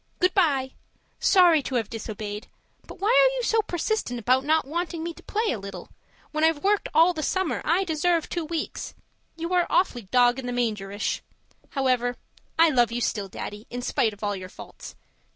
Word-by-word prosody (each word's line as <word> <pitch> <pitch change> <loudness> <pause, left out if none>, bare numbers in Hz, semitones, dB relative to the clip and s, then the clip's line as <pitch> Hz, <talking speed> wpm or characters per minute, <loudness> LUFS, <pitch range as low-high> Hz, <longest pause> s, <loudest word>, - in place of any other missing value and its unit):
Goodbye 315 -8 +2 0.5
sorry 350 -5 +5
to 265 - -4
have 225 -4 0
disobeyed, 215 -2 -6 0.4
but - - -10
why 405 +3 +1
are - - +5
you - - -2
so 450 -1 +3
persistent 355 - -2
about 255 +4 +2
not 315 +2 +2
wanting 335 +2 -3
me 340 0 -4
to - - -15
play 440 +2 -1
a 230 - -3
little? 195 -2 -8 0.4
When 310 0 -1
I've 320 -2 +2
worked 405 +1 +2
all 335 +3 +5
the 315 - -4
summer 375 +2 -1
I 345 +5 +2
deserve 335 -1 +1
two 345 - -3
weeks. 320 0 -4 0.4
You 335 +2 -3
are 355 -1 +3
awfully 245 - +1
dog 245 0 +4
in 255 - -5
the 245 - -2
mangerish. 210 -4 -2 0.5
However 250 -2 0 0.4
I 330 0 +6
love 240 -4 +3
you 240 - -2
still, 210 -4 -1
Daddy, 205 +3 -7
in 245 0 -5
spite 225 -2 +1
of 205 0 -13
all 205 -1 0
your 185 -1 -8
faults. - - -11
290 Hz, 190 wpm, -25 LUFS, 235-350 Hz, 0.5 s, I